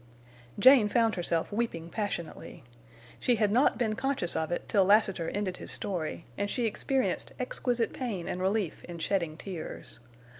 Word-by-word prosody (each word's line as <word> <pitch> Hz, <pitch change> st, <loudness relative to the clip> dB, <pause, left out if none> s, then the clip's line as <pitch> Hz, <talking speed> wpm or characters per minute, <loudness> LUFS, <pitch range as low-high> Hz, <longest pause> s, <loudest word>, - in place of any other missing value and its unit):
Jane 245 Hz, -1 st, +7 dB
found 225 Hz, 0 st, +3 dB
herself 170 Hz, -1 st, -1 dB
weeping 185 Hz, -7 st, -2 dB
passionately. 205 Hz, -6 st, -5 dB, 0.6 s
She 245 Hz, -, +2 dB
had 210 Hz, -2 st, +2 dB
not 245 Hz, +3 st, +4 dB
been 220 Hz, -3 st, +1 dB
conscious 255 Hz, -7 st, -1 dB
of 160 Hz, +1 st, -1 dB
it 175 Hz, -, -3 dB
till 200 Hz, -4 st, +4 dB
Lassiter 195 Hz, -4 st, +3 dB
ended 195 Hz, -3 st, -2 dB
his -, -, -8 dB
story, 170 Hz, -4 st, -3 dB
and 205 Hz, 0 st, 0 dB
she 245 Hz, +1 st, -1 dB
experienced 260 Hz, +4 st, -1 dB
exquisite 245 Hz, -, -1 dB
pain 215 Hz, -10 st, -4 dB
and 180 Hz, -, -3 dB
relief 195 Hz, -2 st, -1 dB
in 175 Hz, -1 st, -8 dB
shedding 170 Hz, -2 st, -1 dB
tears. 180 Hz, -9 st, -7 dB
205 Hz, 155 wpm, -29 LUFS, 175-230 Hz, 0.6 s, Jane